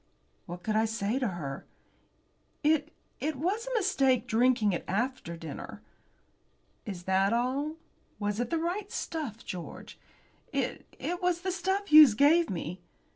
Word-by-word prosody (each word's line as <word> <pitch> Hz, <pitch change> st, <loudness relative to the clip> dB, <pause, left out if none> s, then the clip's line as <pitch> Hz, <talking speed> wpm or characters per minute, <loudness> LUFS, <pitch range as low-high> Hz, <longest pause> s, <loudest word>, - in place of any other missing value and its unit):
What 175 Hz, +1 st, -7 dB
could 215 Hz, +2 st, -1 dB
I 220 Hz, +1 st, +3 dB
say 225 Hz, +2 st, -1 dB
to 255 Hz, -, 0 dB
her? 155 Hz, -8 st, -5 dB, 1.0 s
"It 305 Hz, 0 st, +2 dB, 0.3 s
it 310 Hz, +1 st, -1 dB
was 390 Hz, -, -1 dB
a -, -, -3 dB
mistake 275 Hz, -, +2 dB
drinking 230 Hz, -3 st, +3 dB
it 175 Hz, -, -2 dB
after 210 Hz, -4 st, -2 dB
dinner." 160 Hz, -3 st, -8 dB, 1.0 s
"Is 185 Hz, -4 st, -5 dB
that 190 Hz, +3 st, +2 dB
all? 265 Hz, +6 st, 0 dB, 0.4 s
Was 205 Hz, 0 st, -2 dB
it 240 Hz, -1 st, -1 dB
the 330 Hz, -, 0 dB
right 360 Hz, +5 st, -2 dB
stuff, 275 Hz, -9 st, -4 dB
George?" 175 Hz, -2 st, -8 dB, 0.5 s
"It -, -, -2 dB
it 355 Hz, +1 st, -3 dB
was 360 Hz, -1 st, +1 dB
the 375 Hz, 0 st, -1 dB
stuff 385 Hz, +3 st, -1 dB
Hughes 300 Hz, -7 st, +9 dB
gave 320 Hz, +6 st, +5 dB
me." 175 Hz, 0 st, -4 dB
255 Hz, 145 wpm, -29 LUFS, 200-330 Hz, 1.0 s, Hughes